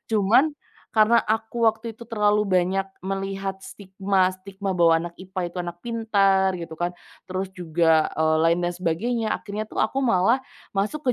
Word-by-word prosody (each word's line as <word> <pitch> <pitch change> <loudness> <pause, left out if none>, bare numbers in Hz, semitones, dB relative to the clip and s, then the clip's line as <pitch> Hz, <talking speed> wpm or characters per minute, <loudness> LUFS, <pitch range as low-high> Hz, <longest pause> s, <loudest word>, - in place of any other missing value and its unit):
Cuman, 225 +9 +4 0.4
karena 220 +1 +5
aku 225 +2 -1
waktu 225 +1 -3
itu 235 - -10
terlalu 210 -2 +2
banyak 190 0 +1 0.2
melihat 195 0 -3
stigma-stigma 190 0 -2
bahwa 170 -1 +5 0.2
anak 170 - -21
IPA 185 0 -5
itu - - -14
anak 175 -1 -5
pintar 200 -5 +2
gitu 165 -1 -7
kan, 175 +1 0 0.4
terus 185 +1 -3
juga, 165 -3 +2
eee, 155 0 +2
lain 165 +1 +3
dan 175 - 0
sebagainya 215 +7 -1
akhirnya 215 0 -5
tuh - - -3
aku 270 - -2
malah 230 +3 +3 0.4
masuk 250 +6 0
195 Hz, 150 wpm, -24 LUFS, 180-220 Hz, 0.4 s, karena